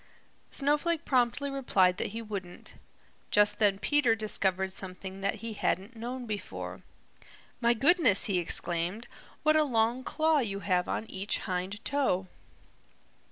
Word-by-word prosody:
Snowflake 300 +3 +1
promptly 260 +2 +1
replied 195 -9 +2
that - - -1
he 225 +3 -6
wouldn't. 195 -5 -7 0.6
Just 205 0 +3
then 205 -3 +4
Peter 255 +1 +2
discovered 190 -3 0
something 190 0 -7
that 200 - 0
he 225 - -3
hadn't 205 +3 -2
known 245 +2 -5
before. 210 -3 -6 0.8
"My 235 -1 +3
goodness," 295 - +4
he 195 -5 +1
exclaimed, 175 +5 0 0.4
"what 310 0 +4
a 310 - +5
long 235 -1 +1
claw 315 +1 +2
you 200 -6 -2
have 180 -3 0
on - - -2
each 195 -1 -2
hind 190 +4 -4
toe!" 260 -10 0
215 Hz, 135 wpm, -29 LUFS, 190-260 Hz, 0.8 s, a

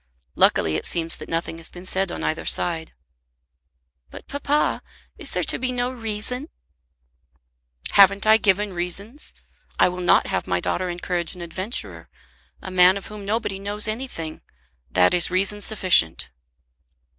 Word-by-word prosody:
Luckily 80 -1 +3
it - - -4
seems 165 -1 -1
that - - -10
nothing 165 0 -3
has 165 - -3
been 180 +1 -12
said 190 -1 0
on - - -6
either 155 - -2
side." 165 -2 0 1.2
"But, - - -12
papa; 285 +1 0 0.4
is 310 -7 0
there 180 - -1
to - - +2
be 255 0 -1
no 245 0 -1
reason?" 245 +4 -4 1.4
"Haven't 200 0 +5
I 220 0 +6
given 205 -1 +1
reasons? 195 - -3 0.5
I - - +4
will 180 0 -6
not 175 - +4
have - - -3
my 90 - 0
daughter 180 - -2
encourage 175 0 -3
an 180 - -10
adventurer, 185 +7 -3 0.5
a 190 - -7
man 185 +1 +5
of 200 - -8
whom 210 -1 -9
nobody 205 -2 -2
knows 205 +2 +1
anything. 215 -9 -5 0.5
That 90 +9 +3
is 175 - +3
reason 200 +3 +1
sufficient." 180 - +3
190 Hz, 150 wpm, -22 LUFS, 175-215 Hz, 1.4 s, I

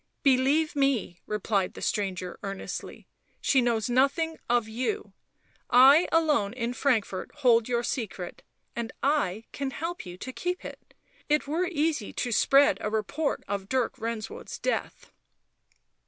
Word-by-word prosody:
" - - -49
Believe 275 +4 +3
me," 270 -11 +1
replied 205 -2 -1
the - - -8
stranger 185 -3 -2
earnestly, 195 -1 -6 0.2
" - - -41
she 265 - +3
knows 235 -3 +1
nothing 280 +6 +1
of 240 -2 +2
you 260 - -3 0.3
— - - -37
I 270 +7 +7
alone 300 -11 +2
in 240 -1 -2
Frankfort 225 -7 0
hold 235 -3 +4
your 240 -1 +1
secret, 210 -8 -4 0.3
and 235 -1 -3
I 225 -8 +1
can 275 -1 -3
help 335 +6 -5
you 175 0 -8
to 260 +7 -7
keep 360 +5 -3
it... - - -11 0.3
it 300 +1 +2
were 330 +6 0
easy 305 - -1
to 245 - -2
spread 275 -3 +4
a 210 - -1
report 220 +8 -1
of 200 -1 -4
Dirk 255 -3 0
Renswoude's 225 -1 -5
death." - - -3
250 Hz, 150 wpm, -27 LUFS, 215-290 Hz, 0.3 s, I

